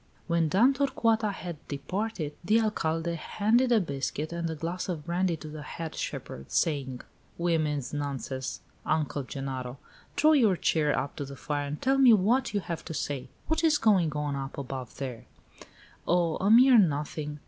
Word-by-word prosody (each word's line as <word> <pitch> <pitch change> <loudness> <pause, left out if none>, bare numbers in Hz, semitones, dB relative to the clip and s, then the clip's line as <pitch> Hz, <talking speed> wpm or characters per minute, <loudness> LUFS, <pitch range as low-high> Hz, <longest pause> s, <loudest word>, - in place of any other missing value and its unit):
When 170 -2 +1
Dame 230 - +5
Torcuata 230 -6 +1
had 175 -4 -6
departed, 160 +2 -3
the 215 +6 +4
Alcalde 170 -6 0
handed 230 +9 +2
a 230 - +6
biscuit 150 -1 -3
and 170 -1 -2
a 160 - -3
glass 170 +5 -4
of 160 -5 -4
brandy 175 0 0
to 155 - -9
the 155 0 -7
head 160 +2 -6
shepherd, 65 +1 -6
saying: 135 -6 0 0.4
"Women's 155 -6 0
nonsense, 135 -8 -4 0.2
Uncle 150 -2 0
Genaro! 130 -1 -5 0.4
Draw 310 +1 +5
your 235 -11 +5
chair 150 -3 +1
up 135 +2 -3
to 145 - -3
the 140 0 -9
fire 145 +1 -3
and 150 +1 -5
tell 270 +1 +2
me 255 -3 +8
what 230 +6 +3
you 205 - 0
have 170 -2 -5
to 160 - -5
say. 135 -4 -3 0.2
What 320 +1 0
is 315 -2 +5
going 195 - +3
on 150 -1 -2
up 135 0 -5
above 130 -2 -6
there?" 130 -4 -5 0.8
"Oh, 170 -2 +2
a 195 - +1
mere 245 +2 +8
nothing! 150 -3 0
165 Hz, 170 wpm, -28 LUFS, 145-210 Hz, 0.8 s, me